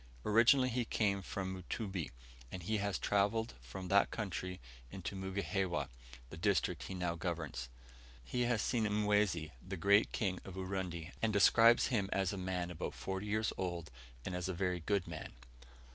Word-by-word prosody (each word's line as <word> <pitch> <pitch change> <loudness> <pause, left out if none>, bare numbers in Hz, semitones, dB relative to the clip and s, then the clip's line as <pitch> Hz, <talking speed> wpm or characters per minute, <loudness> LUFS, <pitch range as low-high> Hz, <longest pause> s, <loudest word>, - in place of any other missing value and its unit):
Originally 120 +4 +5
he 125 0 0
came 100 -3 +1
from 95 0 -4
Mutumbi, 95 -1 -4 0.4
and 90 - -6
he 110 +5 0
has 100 -1 0
travelled 105 +1 +1
from 80 +10 -7
that 100 +1 +5
country 90 -4 -4 0.3
into 95 +3 -5
Mugihewa, 95 -4 -1 0.4
the 80 - -7
district 95 +1 +1
he 95 - -5
now 90 -2 -1
governs. 80 -7 -3 0.5
He 125 - -2
has 120 -4 +1
seen 115 -3 +1
Mwezi, 105 -6 +2
the 95 0 -6
great 100 +5 +4
King 95 -3 -1
of 95 - -9
Urundi, 95 -3 -3
and 110 - +2
describes 115 +3 +6
him 100 -4 +1
as 95 -1 +1
a - - -4
man 90 -1 -2
about 85 - -4
forty 95 +2 -4
years 110 +1 0
old, 85 -4 -3 0.3
and - - -3
as 90 +1 -2
a 95 - -2
very 90 0 0
good 95 +2 0
man. 80 -2 -6
95 Hz, 165 wpm, -35 LUFS, 90-105 Hz, 0.5 s, describes